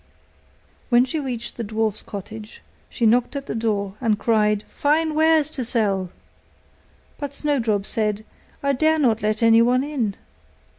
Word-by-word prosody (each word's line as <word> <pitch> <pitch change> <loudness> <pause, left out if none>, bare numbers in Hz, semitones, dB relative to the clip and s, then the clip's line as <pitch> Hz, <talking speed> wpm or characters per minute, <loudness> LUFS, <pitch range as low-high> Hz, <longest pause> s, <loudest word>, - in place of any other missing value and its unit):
When 245 0 +5
she 310 +4 -3
reached 245 -4 -5
the 235 - -3
dwarfs' 220 0 -1
cottage, 210 +2 -9 0.3
she 235 - -1
knocked 240 +5 +3
at 275 -1 -4
the - - -4
door, 210 -3 -1
and 220 -4 +2
cried, 210 -1 +1
'Fine 310 +2 0
wares 315 -1 +4
to 265 - -3
sell!' 205 -6 0 1.1
But 285 -1 -5
Snowdrop 230 -10 0
said, 215 -1 -1 0.4
'I 280 0 +2
dare 315 +4 +2
not 235 -7 +2
let 215 +2 0
anyone 230 +3 +5
in. 255 -9 -2
230 Hz, 145 wpm, -22 LUFS, 215-280 Hz, 1.1 s, When